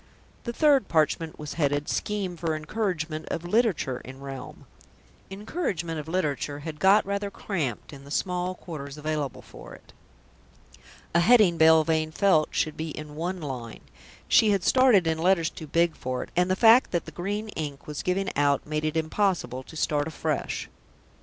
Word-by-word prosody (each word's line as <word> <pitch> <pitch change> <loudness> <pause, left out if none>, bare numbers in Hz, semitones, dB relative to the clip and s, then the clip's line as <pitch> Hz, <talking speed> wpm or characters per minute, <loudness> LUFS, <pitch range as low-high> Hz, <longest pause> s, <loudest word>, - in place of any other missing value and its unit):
The 235 - -2
third 280 -4 +3
parchment 160 0 0
was 150 -1 -6
headed: 145 0 +1
SCHEME 200 -4 -2
FOR 165 -1 -1
ENCOURAGEMENT 160 -2 -3
OF 170 - -4
LITERATURE 180 - +1
IN 130 +1 -10
REALM 135 -2 -9 0.6
"Encouragement 195 - -3
of 150 - -7
Literature" 150 -4 -2
had 155 0 -7
got 200 +2 +5
rather 200 +1 -2
cramped 155 - -4
in 140 -1 -11
the 140 - -13
small 180 +3 -1
quarters 150 -5 -8
available 150 -3 -3
for - - -12
it. - - -19 1.2
A 170 - +4
heading, 200 -2 +5
Belvane 160 0 +4
felt, 160 -3 +3
should 155 - -1
be 160 +1 -4
in 150 0 -8
one 175 +3 -3
line; 125 -6 -6 0.5
she 220 - +5
had 200 -3 +1
started 255 -8 +5
in 160 -1 0
letters 170 -2 +2
too 160 - -9
big 170 +2 +2
for 130 0 -3
it, - - -13
and 180 +1 +2
the 185 - +2
fact 230 +4 +6
that 175 - -1
the - - -9
green 205 +4 -4
ink 145 -7 -6
was 150 -1 -5
giving 190 +1 -1
out 140 -1 +2
made 150 0 -2
it 155 +1 -1
impossible 160 -5 0
to 145 - -13
start 150 0 0
afresh. 160 - -3
160 Hz, 170 wpm, -26 LUFS, 150-195 Hz, 1.2 s, fact